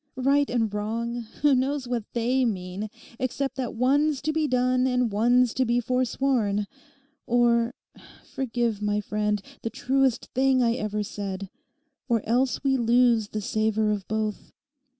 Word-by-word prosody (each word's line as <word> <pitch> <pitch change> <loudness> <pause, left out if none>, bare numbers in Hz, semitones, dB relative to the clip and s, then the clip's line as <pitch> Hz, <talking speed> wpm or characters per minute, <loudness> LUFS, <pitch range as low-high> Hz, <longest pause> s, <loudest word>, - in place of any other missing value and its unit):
Right 280 +2 +2
and 225 -4 0
wrong, 230 +3 -3 0.2
who 290 -1 +6
knows 265 +1 0
what 240 -3 -2
they 250 +3 +1
mean, 195 -2 -3 0.3
except 265 +1 -2
that 250 -3 -3
one's 280 +4 +2
to 310 +2 0
be 315 -1 +1
done 255 0 +2
and 250 -3 +1
one's 240 +3 +3
to 260 - +1
be 240 0 +1
forsworn; 245 -4 0 0.6
or—forgive, 235 -1 -1
my 210 0 0
friend, 210 0 -1 0.2
the 230 - -3
truest 265 0 0
thing 260 -1 +3
I 230 -1 +3
ever 210 -3 -2
said—or 230 - -6
else 250 +4 +1
we 270 -1 +2
lose 235 -2 +3
the 215 +1 -4
savour 215 +1 0
of 205 -3 -3
both. 215 -1 -3
240 Hz, 140 wpm, -26 LUFS, 215-260 Hz, 0.6 s, who